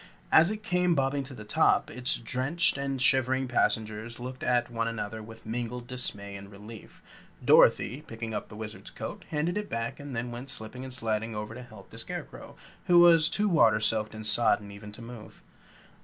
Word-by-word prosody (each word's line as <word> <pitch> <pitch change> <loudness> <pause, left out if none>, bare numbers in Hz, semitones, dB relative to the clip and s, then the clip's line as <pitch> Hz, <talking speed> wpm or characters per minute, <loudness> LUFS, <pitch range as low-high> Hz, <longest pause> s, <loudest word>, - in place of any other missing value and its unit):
As 165 +3 +7
it 215 0 -5
came 180 -2 +2
bobbing 135 0 0
to 130 0 -10
the 110 - -9
top, 105 - +2
its 125 +1 +2
drenched 130 +8 +1
and 140 -1 -3
shivering 130 0 +2
passengers 110 -1 -1
looked 130 +1 -7
at 120 -1 +1
one 115 -1 -1
another 110 -1 -4
with 110 +1 -12
mingled 120 +2 -4
dismay 105 -6 -3
and 100 0 -9
relief. 105 +2 -12 0.4
Dorothy, 125 +8 +5
picking 115 -4 -7
up 105 - -4
the 105 - -11
Wizard's 110 0 -7
coat, - - -7
handed 165 +6 -1
it 210 - -6
back 115 0 -3
and 145 -2 -7
then 120 +1 -3
went 120 +3 -7
slipping 125 +1 -4
and 130 - -7
sliding 110 -2 -2
over 105 +1 -5
to 125 - -8
help 110 -5 -14
the - - -9
Scarecrow, - - -8 0.3
who 175 - +6
was 165 -2 +7
too 210 0 +4
water 115 - +4
soaked 110 0 +1
and 110 0 -7
sodden 105 -2 +2
even 100 +1 -10
to 110 +3 -11
move. 115 -2 -11
120 Hz, 190 wpm, -28 LUFS, 110-135 Hz, 0.4 s, As